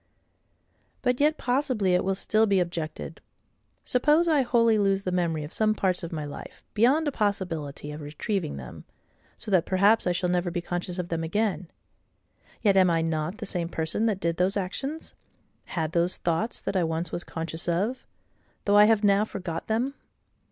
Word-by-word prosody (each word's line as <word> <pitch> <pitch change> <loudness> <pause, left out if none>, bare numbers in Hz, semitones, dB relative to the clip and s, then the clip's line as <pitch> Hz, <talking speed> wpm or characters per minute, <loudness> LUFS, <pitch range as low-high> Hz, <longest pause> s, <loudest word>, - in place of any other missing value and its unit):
But 250 -1 +1
yet 300 +2 +3
possibly 245 -7 +1
it 180 - +3
will 190 +1 0
still 220 +3 +2
be 200 -2 +3
objected,—Suppose 215 - -2
I 305 -4 +4
wholly 230 -3 +3
lose 195 -1 +2
the 185 - -2
memory 170 -4 0
of 150 - -8
some 215 -1 +2
parts 185 -3 0
of 170 - -6
my 155 -3 -4
life, 145 - -9
beyond 265 +9 +3
a - - +1
possibility 175 - -2
of 150 +1 -7
retrieving 150 - -3
them, 65 -2 -9 0.5
so 210 - -8
that 180 -3 +3
perhaps 200 +3 +3
I - - +3
shall 180 +1 0
never 180 0 +1
be 175 +1 -2
conscious 175 +1 -4
of 180 -1 -3
them 165 -1 -2
again; 185 0 -1 0.9
yet 200 -3 +4
am 185 -1 +6
I 165 -1 +2
not 160 +3 -2
the 225 - -6
same 175 -4 -2
person 165 +7 -1
that 205 -4 0
did 170 -2 -1
those 185 +3 +1
actions, 270 - -4 0.5
had 160 -3 -3
those 170 +2 +2
thoughts 175 +8 -1
that - - -3
I 185 - +3
once 165 +1 -2
was 175 - -3
conscious 165 0 -5
of, 205 +10 0 0.6
though 205 0 +4
I 210 - +9
have 220 -1 +3
now 200 0 +4
forgot 180 -6 -5
them? 235 +5 0
185 Hz, 180 wpm, -26 LUFS, 170-220 Hz, 0.9 s, I